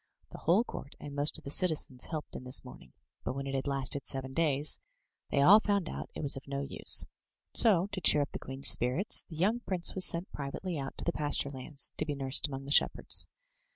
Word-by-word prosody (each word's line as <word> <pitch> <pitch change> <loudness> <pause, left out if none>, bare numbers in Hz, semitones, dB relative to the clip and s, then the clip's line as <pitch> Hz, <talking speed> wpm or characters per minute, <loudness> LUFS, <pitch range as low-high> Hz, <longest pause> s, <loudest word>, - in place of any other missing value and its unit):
The - - -10
whole 180 +8 +2
court 145 - -10
and 145 - -9
most 145 +1 0
of - - -15
the 140 - -6
citizens 155 -8 0
helped 155 -2 -7
in - - -7
this 125 0 0
mourning, - - -14 0.3
but - - -3
when 140 0 -5
it 135 - -5
had 135 +1 -3
lasted 140 0 -2
seven 135 0 -3
days 150 -2 +2 0.5
they 140 - +1
all 200 +8 +8
found 200 -5 -1
out - - -7
it - - -6
was 140 - +4
of 135 - -10
no 140 0 -4
use. 140 - +3 0.5
So 195 -6 +5
to 195 -2 -4
cheer 150 -2 +4
up 145 - -8
the - - -7
queen's 135 +1 -4
spirits, 130 - +2
the 160 - -10
young 205 +9 0
prince 185 -7 -2
was 190 - +3
sent 170 +3 -1
privately 150 +6 -6
out 135 -2 -6
to - - +3
the 170 - -1
pasture 145 -1 0
lands, 135 +1 -1
to - - 0
be 145 - -3
nursed 135 +1 +4
among 135 -1 -7
the 140 - -7
shepherds. - - +3
145 Hz, 225 wpm, -30 LUFS, 135-170 Hz, 0.5 s, all